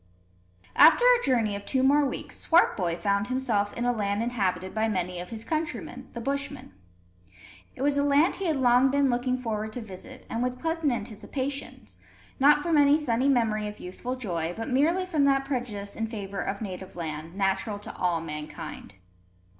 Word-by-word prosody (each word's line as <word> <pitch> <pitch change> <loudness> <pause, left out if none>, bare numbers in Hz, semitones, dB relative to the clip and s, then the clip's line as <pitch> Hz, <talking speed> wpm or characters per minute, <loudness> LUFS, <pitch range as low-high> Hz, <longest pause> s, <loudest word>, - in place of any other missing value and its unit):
After 330 +11 +7
a - - +6
journey 225 -6 +1
of 200 - -6
two 260 +4 0
more 285 +2 +5
weeks, - - -6
Swartboy 185 - +3
found 200 +1 0
himself 235 -6 0
in 240 - -3
a 245 - +3
land 205 -2 -1
inhabited 190 -6 -1
by 220 0 +1
many 180 -3 -2
of 180 - -7
his 225 -1 -6
countrymen, 310 -1 -4
the 235 - -5
Bushmen. 275 - -4 1.0
It 260 - -4
was 285 0 +2
a - - +2
land 290 +4 +3
he 385 - -2
had 320 - +1
long 250 0 +4
been 280 -1 +2
looking 250 +1 0
forward 220 -3 -3
to 245 - -4
visit, 190 -4 -10
and 230 - -3
with 250 0 -1
pleasant 325 -1 0
anticipations, 240 +5 -5 0.4
not 295 +2 +5
from 330 -3 +3
any 285 +1 +6
sunny 265 -3 +1
memory 220 -5 +1
of 210 - -8
youthful 240 +8 -5
joy, 175 -8 -3
but 225 - -4
merely 320 +8 +2
from 320 -6 +1
that 270 -1 +3
prejudice 235 -7 -3
in 225 - -2
favour 200 -3 -6
of 200 +2 -3
native 190 -1 -7
land, 160 0 -5
natural 195 +1 0
to 205 - -9
all 175 -2 0
mankind. 150 - -7
235 Hz, 180 wpm, -27 LUFS, 200-275 Hz, 1.0 s, After